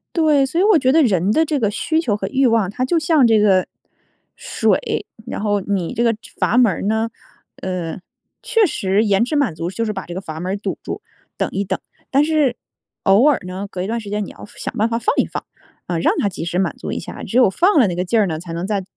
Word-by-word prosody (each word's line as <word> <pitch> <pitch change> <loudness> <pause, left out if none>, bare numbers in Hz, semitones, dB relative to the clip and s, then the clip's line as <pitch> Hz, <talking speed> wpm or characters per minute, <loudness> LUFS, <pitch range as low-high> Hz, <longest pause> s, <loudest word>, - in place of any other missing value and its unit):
对， 305 -5 +4
所 330 +6 -2
以 - - +4
我 420 -3 +5
觉 260 -3 +2
得 320 +3 +5
人 195 -4 +2
的 320 +6 +3
这 300 -1 -1
个 210 -3 +1
需 315 +8 0
求 225 -11 0
和 - - -3
欲 270 0 +1
望 225 -5 +2
它 250 +5 -3
就 330 +6 +2
像 310 -4 +3
这 225 -2 +4
个 195 -3 +4 0.7
水， 450 -3 -1 0.2
然 - - -5
后 205 -1 +1
你 190 -4 -2
这 235 - 0
个 230 -1 +3 0.2
阀 240 - +1
门 235 -6 +5
儿 - - -5
呢， 220 +2 0 0.5
呃， 180 -2 -4 0.4
确 455 -3 +3
实 205 - +1
延 200 +2 +3
迟 275 +5 -2
满 245 - +1
足 170 +2 -3
就 230 +4 -2
是 215 - -2
把 190 - -6
这 175 - -7
个 185 - -4
阀 160 -4 -7
门 180 +3 -3
儿 200 - -1
堵 200 - -4
住， - - -5 0.4
等 - - -1
一 200 - -1
等， 195 - -3 0.3
但 280 +2 +3
是 300 -6 +1 0.5
偶 200 +6 +5
尔 285 - +2
呢 190 +2 -5
隔 180 - -4
一 - - -3
段 230 +1 -1
时 205 - -9
间 210 0 -2
你 - - -9
要 - - -11
想 - - -5
办 220 +2 +2
法 230 0 -1
放 445 - 0
一 - - +3
放， - - -6 0.4
啊， 175 - -1
让 - - +2
它 - - +2
及 180 -4 -5
时 175 +2 -1
满 190 - 0
足 - - -6
一 - - -3
下， - - -8
只 235 - -2
有 245 -6 +6
放 345 - +3
了 230 - +5
那 175 - -2
个 180 - -1
劲 220 +5 +1
儿 205 - +3
呢， 160 -3 -2
才 170 +1 -8
能 170 +3 -3
再 200 -3 -1
215 Hz, 280 characters per minute, -19 LUFS, 190-265 Hz, 0.7 s, 有